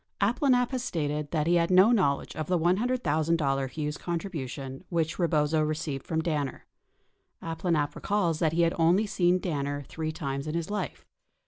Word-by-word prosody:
46 220 +5 +1
Abplanalp 250 -3 +3
has 255 -2 -2
stated 150 - -2
that 155 -3 0
he 175 +2 +3
had 170 0 +2
no 190 +5 +6
knowledge 160 -12 +1
of 155 -1 -4
the 180 - +2
$100,000 165 - +1
Hughes 150 +2 -3
contribution 150 -6 -5
which 165 -1 -1
Rebozo 155 -2 +2
received 155 -3 -3
from 160 -1 -1
Danner. 150 -5 -2 0.8
Abplanalp 165 -2 -1
recalls 180 -6 0
that 160 -2 +1
he 170 +1 +3
has 170 - +2
only 175 +6 +4
seen 180 -3 +2
Danner 145 -5 -2
three 155 +3 -4
times 140 -3 -4
in 155 - -3
his 170 +3 -3
life. 200 -8 -4
160 Hz, 165 wpm, -28 LUFS, 150-180 Hz, 0.8 s, no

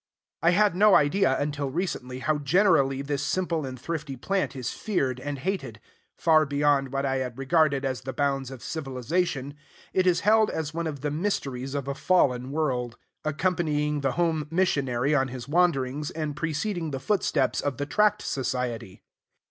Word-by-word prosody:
I 170 - +4
had 200 +1 +3
no 205 +2 +6
idea, 145 -2 +3
until 145 -1 -2
recently, 130 -5 -3
how 155 +1 +1
generally 145 -4 +3
this 140 -1 -2
simple 165 -2 -1
and 130 -1 -7
thrifty 150 -1 -4
plant 190 +5 -1
is 130 -1 -3
feared 135 - -1
and 145 +2 -4
hated. 135 - -3 0.4
Far 155 -1 +4
beyond 140 -1 +2
what 135 0 -1
I 135 -1 0
had 125 -2 -4
regarded 140 0 +2
as 130 -2 -2
the 130 +1 -5
bounds 135 0 -1
of 135 -3 -10
civilization, 140 0 -2 0.4
it 185 0 +2
is 180 - +3
held 215 +1 +4
as 160 -1 -3
one 165 0 -2
of 145 -4 -5
the 150 0 -2
mysteries 140 -6 -2
of 140 -1 -3
a 140 - -1
fallen 130 -7 +2
world; 130 -5 -1 0.3
accompanying 155 -2 0
the 135 -2 0
home 165 -3 0
missionary 140 -7 +1
on 135 -3 +2
his 125 -1 -7
wanderings, 150 -4 +1
and 155 -2 -4
preceding 165 +3 -2
the 135 -2 -4
footsteps 140 -4 +1
of 145 -3 -2
the 145 - -2
Tract 210 +6 +2
Society. 125 -7 -3
145 Hz, 170 wpm, -26 LUFS, 135-165 Hz, 0.4 s, no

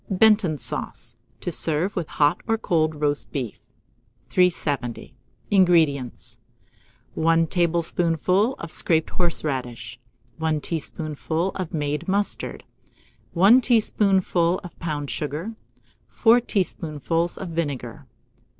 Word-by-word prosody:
BENTON 205 -4 +4
SAUCE 120 -1 -4 0.3
(to 175 - -3
serve 165 +4 +1
with 170 -4 -2
Hot 150 +4 +1
or 225 -1 +2
Cold 160 -7 0
Roast 145 -1 -1
Beef). 125 -7 -4 0.7
370. 145 -9 0 0.4
INGREDIENTS. 165 - +2 0.7
1 165 +1 +3
tablespoonful 175 - +1
of 165 - -8
scraped 160 -2 +1
horseradish, 135 -8 -2 0.4
1 160 -1 0
teaspoonful 160 +2 -3
of 185 -4 -5
made 150 +1 -2
mustard, 200 +2 -2 0.7
1 200 +9 +6
teaspoonful 195 -7 +2
of 175 - -11
pounded 150 -4 -3
sugar, 155 +9 -4 0.5
4 235 +2 +4
tablespoonfuls 170 - -1
of 190 - -6
vinegar. 145 -8 -4
165 Hz, 100 wpm, -24 LUFS, 150-185 Hz, 0.7 s, 1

